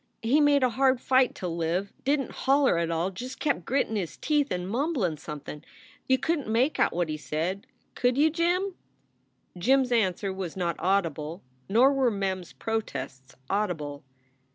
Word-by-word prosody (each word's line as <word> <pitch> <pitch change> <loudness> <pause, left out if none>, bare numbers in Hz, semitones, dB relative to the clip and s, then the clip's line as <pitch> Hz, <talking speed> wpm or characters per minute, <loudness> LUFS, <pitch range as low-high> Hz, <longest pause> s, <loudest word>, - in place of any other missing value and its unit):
He 265 +7 +4
made 290 -2 +4
a 255 - +4
hard 260 +1 +3
fight 260 0 +3
to 180 - -4
live. 170 +3 -2
Didn 280 0 +2
t - - -11
holler 270 -8 +3
at 170 - 0
tall 170 +3 0
just 250 +7 -7
kept 280 - 0
grittin 260 -4 0
his 185 -6 -3
teeth 295 -2 +1
and 180 0 -3
mumblin 235 - 0
somethin. 150 0 -8 0.5
You 260 - +5
couldn 305 +2 -1
t - - -7
make 245 +7 +1
out - - +3
what 175 -1 -1
he 155 0 -3
said. 165 +6 -3 0.3
Could 245 +1 +1
you, 310 +2 +4
Jim?" 355 +4 0 0.8
Jim 260 +10 +3
s 250 -1 -3
answer 195 -4 +1
was 190 -2 -5
not 175 -2 -1
audible. 165 -4 -1 0.3
Nor 250 +7 +5
were 265 -2 +3
Mem 195 -3 -1
s 180 - -12
protests 140 - -5
audible. 160 -8 -2
210 Hz, 175 wpm, -27 LUFS, 175-270 Hz, 0.8 s, You